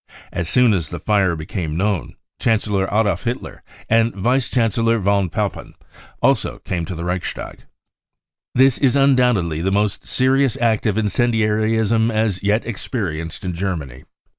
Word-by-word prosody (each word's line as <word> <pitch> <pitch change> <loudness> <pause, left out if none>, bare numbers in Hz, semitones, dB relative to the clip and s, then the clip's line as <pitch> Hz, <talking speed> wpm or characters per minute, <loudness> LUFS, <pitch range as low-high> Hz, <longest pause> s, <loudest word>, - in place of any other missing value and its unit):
As 85 -1 -3
soon 125 -3 +4
as 85 -6 -1
the 85 - -5
fire 100 -2 +2
had 85 - -2
become 80 0 -4
known, 100 -1 -1 0.2
Chancellor 105 -3 +1
Adolf 105 -4 +1
Hitler 120 0 -4 0.3
and 115 0 +2
Vice 125 +6 +1
Chancellor 115 -1 +1
von 100 -2 +1
Papen - - -4 0.5
also - - +2
came 85 -2 -2
to 90 - -6
the 85 +1 -5
Reichstag. 90 0 -5 0.5
" - - -60
This 130 0 +4
is 135 -2 +3
undoubtedly 125 - +2
the 95 - 0
most 105 +1 -1
serious 130 -1 +2
act 115 -3 +1
0 105 -2 +1
of 110 - +1
incen 120 +3 +1
diarism 110 +1 +1
as 110 -4 0
yet 105 +3 +1
experienced 95 - -4
in 90 - -2
Germany. 80 -9 -4
105 Hz, 160 wpm, -20 LUFS, 90-115 Hz, 0.5 s, soon